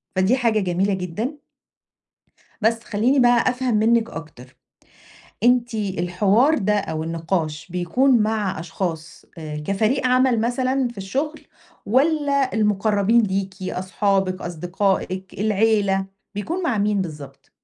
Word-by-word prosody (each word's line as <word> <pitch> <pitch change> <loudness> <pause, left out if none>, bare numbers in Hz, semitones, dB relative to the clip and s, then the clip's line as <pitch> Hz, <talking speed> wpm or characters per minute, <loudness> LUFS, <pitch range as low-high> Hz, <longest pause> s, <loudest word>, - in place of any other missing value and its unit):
فدي 190 +6 +3
حاجة 230 -3 +2
جميلة 190 +1 0
جدًا. 190 - -3 1.3
بس 225 +1 +1
خليني 240 +7 +1
بقى 245 0 +4
أفهم 250 -2 -1
منِك 230 +1 +2
أكتر. 130 -6 -11 0.9
أنتِ 245 -1 +3
الحوار 200 - +2
ده 210 -1 +1
أو 160 -5 -4
النقاش، 165 -1 -3
بيكون 240 +9 +2
مع 210 -5 -1
أشخاص 165 -1 -5
آآ 155 -2 -6
كفريق 215 +7 +1
عمل 255 -2 +3
مثلًا 255 +2 0
في 235 - -18
الشغل، 275 +11 -3 0.4
والّا 280 +2 +2
المقربين 210 +1 +2
ليكِ، 190 -1 -2
أصحابِك، 185 0 -1
أصدقائِك، 185 +2 -2
العيلة، 205 -2 +2 0.3
بيكون 330 - -3
مع 255 -10 0
مين 205 -1 +1
بالضبط؟ 140 -5 -9
205 Hz, 115 wpm, -22 LUFS, 185-240 Hz, 1.3 s, بقى